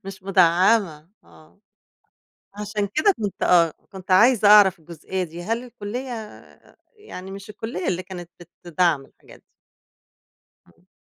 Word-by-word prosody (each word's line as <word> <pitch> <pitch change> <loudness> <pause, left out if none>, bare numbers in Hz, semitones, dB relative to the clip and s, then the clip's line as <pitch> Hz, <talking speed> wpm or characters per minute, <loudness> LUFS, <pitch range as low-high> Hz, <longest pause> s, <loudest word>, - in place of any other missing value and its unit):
مش 195 0 -9
مدعّمة 180 -3 +2 0.2
آه، 80 0 -21 1.0
عشان 210 0 -3
كده 405 +7 +3
كنت 205 -3 -4
آه، 170 -2 +4 0.2
كنت 190 -1 -9
عايزة 220 +3 +5
أعرف 200 -3 +6
الجزئية 170 +3 -6
دي، 170 0 -9
هل 230 +5 -2
الكُلّية 245 +2 -7 0.9
يعني 195 - -10
مش 195 +1 -10
الكُلّية 210 -3 -6
اللي 185 0 -2
كانت 180 -2 -10 0.3
بتدعّم 170 -4 0
الحاجات - - -19
دي؟ - - -35 1.3
امم. 175 - -28
190 Hz, 125 wpm, -22 LUFS, 170-210 Hz, 1.3 s, أعرف